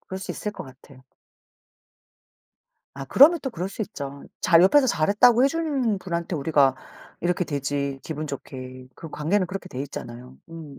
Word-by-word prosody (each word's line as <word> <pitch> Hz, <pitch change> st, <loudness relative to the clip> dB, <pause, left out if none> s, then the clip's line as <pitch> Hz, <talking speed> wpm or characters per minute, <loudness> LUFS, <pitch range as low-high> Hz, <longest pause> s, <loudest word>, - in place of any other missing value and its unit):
그럴 190 Hz, -, -7 dB
수 190 Hz, -, -7 dB
있을 210 Hz, -, -4 dB
것 -, -, -8 dB
같아요. 130 Hz, 0 st, -17 dB, 1.9 s
아 135 Hz, -, -7 dB
그러면 295 Hz, -, +6 dB
또 265 Hz, -, -3 dB
그럴 180 Hz, -4 st, -4 dB
수 215 Hz, +3 st, -5 dB
있죠. 140 Hz, -9 st, -7 dB, 0.2 s
잘 170 Hz, -1 st, +5 dB
옆에서 265 Hz, +8 st, +5 dB
잘했다고 230 Hz, +6 st, +4 dB
해 -, -, +5 dB
주는 275 Hz, -10 st, -1 dB
분한테 170 Hz, -1 st, -4 dB
우리가 140 Hz, -2 st, +3 dB, 0.5 s
이렇게 180 Hz, +1 st, 0 dB
되지 140 Hz, -1 st, -3 dB
기분 155 Hz, -1 st, -5 dB
좋게. 130 Hz, -2 st, -8 dB
그 165 Hz, -, -10 dB
관계는 185 Hz, +6 st, 0 dB
그렇게 190 Hz, +1 st, -7 dB
돼 130 Hz, -6 st, -6 dB
있잖아요. 125 Hz, -2 st, -9 dB
음. 160 Hz, -4 st, -10 dB
165 Hz, 325 characters per minute, -24 LUFS, 140-200 Hz, 1.9 s, 그러면